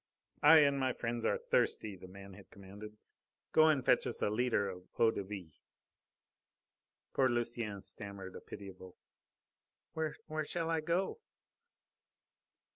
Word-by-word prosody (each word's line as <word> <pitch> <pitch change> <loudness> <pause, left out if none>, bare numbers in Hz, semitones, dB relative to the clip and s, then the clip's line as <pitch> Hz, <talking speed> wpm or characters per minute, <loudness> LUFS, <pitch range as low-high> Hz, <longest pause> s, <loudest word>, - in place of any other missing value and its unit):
"I 155 +1 +9
and 140 -1 +3
my 130 -1 +1
friends 120 -1 -3
are - - +2
thirsty," 105 -2 0
the 90 0 -12
man 100 +1 -11
had 100 0 -14
commanded. 100 +2 -11 0.5
"Go 155 0 +6
and 145 -5 +2
fetch - - +4
us 120 - -2
a 105 - +2
litre 115 -2 +1
of 90 -1 -8
eau 115 -1 +5
de - - -3
vie." 95 -6 -9 1.5
Poor 130 -1 +3
Lucienne 115 -4 -2
stammered 100 -3 -8
a - - -8
pitiable: 95 -2 -10 1.0
"Where 160 -1 -2 0.3
shall 165 +2 -2
I 160 -1 +1
go?" 170 - -1
110 Hz, 135 wpm, -34 LUFS, 100-140 Hz, 1.5 s, I